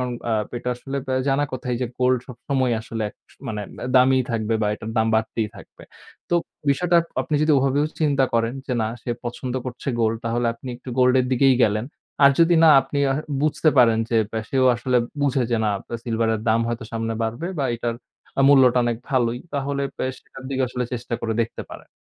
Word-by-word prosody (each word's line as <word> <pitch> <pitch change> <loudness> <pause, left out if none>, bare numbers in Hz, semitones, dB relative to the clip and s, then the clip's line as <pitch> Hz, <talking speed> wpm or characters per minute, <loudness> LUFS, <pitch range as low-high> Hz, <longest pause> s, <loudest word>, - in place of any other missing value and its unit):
App 120 -3 -2
এটা 125 - -5
আসলে 135 +3 -6 0.3
জানা 140 +2 +2
কথাই 125 -1 -3
যে - - 0
gold 125 0 +3
সবসময় 130 0 -1
আসলে 115 0 -4 0.3
স - - -22
মানে 105 -1 -3 0.3
দামিই 130 0 +5
থাকবে 115 -1 -1
বা - - +2
এটার 110 +1 -7
দাম 110 0 +3
বাড়তেই 110 0 0
থাকবে। - - -14 0.5
তো - - +2 0.4
বিষয়টা 175 +5 +2
আপ 170 - -7
আপনি 155 - -3
যদি 155 0 +3
ওভাবেও 135 +2 +1
চিন্তা 140 -3 +3
করেন 115 +1 +1
যে - - -2
না - - 0 0.2
সে - - -4
পছন্দ 120 +1 -4
করছে 125 +1 -6
gold 110 0 +2
তাহলে 120 +1 0
আপনি 130 - -10
একটু 125 - -13
gold 125 0 +5
এর 125 - -1
দিকেই 130 +1 +4
গেলেন। 105 +1 +2 0.4
আর 140 - +9
যদি 170 +1 +5
না - - +8
আপনি 135 +2 -4
আ - - 0 0.3
বুঝতে 155 +1 +2
পারেন 115 -3 +5
যে 115 - +2 0.3
সেও 130 -1 +2
আসলে 125 +2 0 0.3
বুঝে 140 -2 +2
যে 120 - +2
না - - +2
আপনার 115 - -7
silver 115 -1 0
এর 110 - -3
দাম 110 +1 +3
হয়তো 120 -1 -3
সামনে 115 0 -2
বাড়বে 115 +9 -3
বা 140 - 0
এটার 120 0 -2 0.4
আ - - +4
মূল্যটা 130 -3 +6
অনেক 120 -1 0
ভালোই। 120 -3 +1 0.2
তাহলে 140 0 -2
এপ 135 - -20 0.2
সেটার 135 - -14
দিকে 130 -1 0
আসলে 125 0 -3
চেষ্টা 120 0 -3
করে 115 -1 -1
দেখতে 115 - -6
পারেন। - - -11
125 Hz, 200 wpm, -23 LUFS, 115-135 Hz, 0.5 s, আর